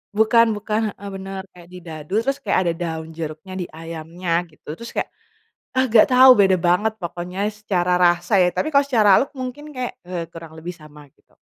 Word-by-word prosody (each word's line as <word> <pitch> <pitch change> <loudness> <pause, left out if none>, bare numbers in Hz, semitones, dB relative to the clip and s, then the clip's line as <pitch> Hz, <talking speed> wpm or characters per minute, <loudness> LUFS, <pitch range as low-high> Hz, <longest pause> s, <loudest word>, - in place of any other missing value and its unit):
bukan 220 +2 +5
bukan, 210 +1 -2 0.2
heeh, 200 - -9
bener 195 0 -6
kayak 175 -1 -16
didadu 165 -2 -9
terus 275 +2 -1
kayak - - +1
ada 170 -2 0
daun 160 -1 -4
jeruknya 160 +4 -6
di 175 - -3
ayamnya 165 +2 -7 0.2
gitu 155 - -27
terus 235 - -8
kayak, - - -1 0.7
ah, 260 - +4
gak 215 - +7
tau 260 +1 +7
beda 195 -5 +4
banget 180 +6 +1
pokoknya 175 +2 -6
secara 190 -4 -1
rasa 175 +2 +2
ya 180 - +4
tapi 240 - -2
kalo 280 - +6
secara 220 -6 +4
look 275 - -3
mungkin 255 +3 -6
kayak, 255 -1 -3 0.2
eee, 175 -2 -3
kurang 165 -1 -11
lebih 175 +3 -6
sama 150 -1 -14
gitu. - - -35
180 Hz, 190 wpm, -21 LUFS, 170-220 Hz, 0.7 s, gak